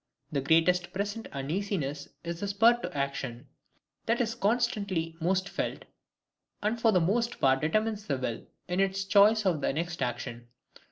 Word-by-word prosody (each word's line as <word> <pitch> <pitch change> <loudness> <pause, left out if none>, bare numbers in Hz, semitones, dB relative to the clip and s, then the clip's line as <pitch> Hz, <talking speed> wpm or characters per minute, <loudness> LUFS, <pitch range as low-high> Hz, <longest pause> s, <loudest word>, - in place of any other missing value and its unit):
The 140 - 0
greatest 175 +4 +3
present 205 +3 -3
uneasiness 145 -1 -3
is 170 0 -4
the 200 - -2
spur 215 +4 +5
to - - -5
action, 140 -3 -3 0.6
that 230 +1 +2
is 230 -2 0
constantly 200 -7 0
most 185 +3 +1
felt, - - -4 0.8
and 225 +2 0
for 225 - +5
the 185 - +4
most 230 +8 0
part 135 0 +3
determines 215 +6 0
the 140 - 0
will 125 -3 -4 0.2
in 180 +1 -1
its 195 0 +1
choice 210 +2 +5
of 170 -6 +1
the - - +1
next 170 +3 -3
action. 120 -1 -3
180 Hz, 160 wpm, -29 LUFS, 145-210 Hz, 0.8 s, spur